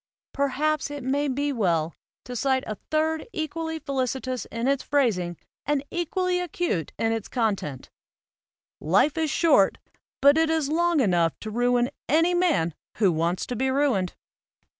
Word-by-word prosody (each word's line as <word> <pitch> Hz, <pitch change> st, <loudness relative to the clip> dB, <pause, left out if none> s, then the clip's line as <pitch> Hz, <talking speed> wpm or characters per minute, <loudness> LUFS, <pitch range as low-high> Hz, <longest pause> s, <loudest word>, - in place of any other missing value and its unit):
Per 280 Hz, 0 st, +1 dB
haps 305 Hz, +2 st, 0 dB
it 290 Hz, -2 st, -6 dB
may 280 Hz, +3 st, 0 dB
be 285 Hz, +2 st, -1 dB
well 170 Hz, -, 0 dB, 0.3 s
to 250 Hz, -, -6 dB
cite 260 Hz, +2 st, +1 dB
a 215 Hz, -, -3 dB, 0.2 s
third 315 Hz, +1 st, 0 dB
equally 320 Hz, +1 st, -3 dB
felici 270 Hz, -4 st, -2 dB
tous 255 Hz, -1 st, -4 dB
in 230 Hz, +2 st, -3 dB
its 275 Hz, -1 st, +2 dB
phrasing 190 Hz, -, 0 dB, 0.3 s
and 290 Hz, -2 st, 0 dB
equally 360 Hz, +1 st, 0 dB
acute 345 Hz, -, -2 dB
in 225 Hz, -, +1 dB
its 225 Hz, -2 st, -2 dB
con 225 Hz, -5 st, +1 dB
tent: 140 Hz, -8 st, -8 dB, 0.9 s
"Life 195 Hz, -, +3 dB
is 320 Hz, -2 st, 0 dB
short, 285 Hz, -, +4 dB, 0.4 s
but 285 Hz, +3 st, +6 dB
it 325 Hz, 0 st, +3 dB
is 320 Hz, -3 st, +1 dB
long 340 Hz, -1 st, +2 dB
enough 175 Hz, -7 st, +2 dB
to 215 Hz, -, -5 dB
ruin 245 Hz, +2 st, +2 dB, 0.2 s
any 330 Hz, +4 st, +3 dB
man 330 Hz, -, +2 dB, 0.2 s
who 200 Hz, -4 st, +4 dB
wants 170 Hz, +2 st, 0 dB
to 250 Hz, -, -4 dB
be 265 Hz, +3 st, 0 dB
ruined." 260 Hz, -10 st, +1 dB
270 Hz, 160 wpm, -25 LUFS, 220-310 Hz, 0.9 s, but